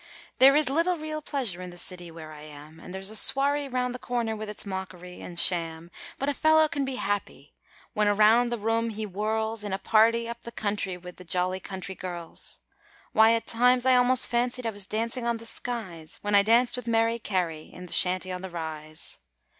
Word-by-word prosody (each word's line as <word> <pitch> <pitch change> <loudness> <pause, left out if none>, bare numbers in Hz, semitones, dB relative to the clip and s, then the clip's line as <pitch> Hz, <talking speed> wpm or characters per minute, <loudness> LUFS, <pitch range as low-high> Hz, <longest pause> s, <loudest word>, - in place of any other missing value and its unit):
There 270 +2 +8
is 300 -1 +4
little 335 +6 +1
real 310 0 -5
pleasure 245 -12 -2
in 180 - -7
the 175 - -12
city 175 -1 -5
where 160 -1 -10
I 150 - -11
am 155 +3 -12
There's 190 +2 -3
a - - -8
swarry 280 +4 +4
round 250 -1 -1
the 250 - -7
corner 235 -3 -2
with 215 0 -6
its 210 - -6
mockery 180 -2 -7
and 175 -1 -5
sham; 165 -1 +1 0.3
But 275 - -3
a 285 - +1
fellow 315 +2 +4
can 290 -3 -2
be 265 -1 -3
happy 205 -3 -4 0.4
when 210 -3 +2
around 215 +4 +5
the 240 - -2
room 225 +2 0
he 220 0 -5
whirls 215 +2 -1
In 205 -2 -4
a - - 0
party 230 +3 +3
up 235 0 -7
the 235 - -8
country 205 -4 -2
with 180 0 -11
the 180 - -11
jolly 180 +1 0
country 190 0 -7
girls. 175 -3 -5 0.5
Why, 220 +1 +6
at 230 - -1
times 250 +2 +3
I 260 -1 +6
almost 250 0 +4
fancied 245 +1 0
I 225 - 0
was 200 -2 -5
dancing 230 +3 -2
on 235 -1 0
the 230 - -11
skies, 190 -10 -4
When 205 0 -1
I 200 - +7
danced 235 +4 +3
with 250 -1 -7
Mary 230 0 +2
Carey 175 -7 -2
in 180 - -10
the 180 - 0
Shanty 185 0 +2
on 180 0 -5
the 190 - -6
Rise. 155 -2 -6
215 Hz, 210 wpm, -27 LUFS, 180-245 Hz, 0.5 s, There